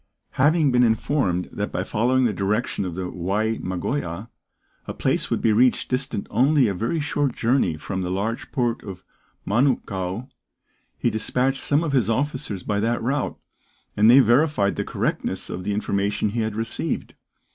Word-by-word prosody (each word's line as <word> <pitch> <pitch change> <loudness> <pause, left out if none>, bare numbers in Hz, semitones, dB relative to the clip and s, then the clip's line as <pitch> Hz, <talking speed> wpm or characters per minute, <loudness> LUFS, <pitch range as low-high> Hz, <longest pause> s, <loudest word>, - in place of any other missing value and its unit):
Having 150 +1 +3
been 125 0 +4
informed 110 -5 +1
that - - -3
by - - -2
following 125 +4 +1
the 110 - +1
direction 100 +2 -1
of 90 -2 -5
the 90 0 -3
Wai 100 +6 -1
Magoia, 95 - -3 0.6
a - - -5
place - - 0
would - - 0
be 110 - +4
reached 125 +3 +3
distant 125 -5 -1
only 135 +3 +4
a 100 - 0
very 115 - -1
short 145 -3 -1
journey 120 - +1
from 95 +5 -4
the 90 - -3
large 105 +5 -3
port 120 -4 0
of 95 -2 -8 0.4
Manukau, 105 -3 0 0.7
he - - +1
despatched 125 +5 0
some 145 +3 +1
of 155 - -1
his 125 -6 +2
officers 115 -5 -2
by 100 -1 -1
that 115 +3 0
route, 130 +3 -1 0.6
and 105 +2 +5
they 130 +3 +9
verified 120 -3 +3
the - - -1
correctness - - -2
of 90 - -5
the 105 - -2
information 100 0 0
he 115 +3 -3
had 110 -1 -1
received. 115 +1 -2
115 Hz, 170 wpm, -23 LUFS, 100-130 Hz, 0.7 s, they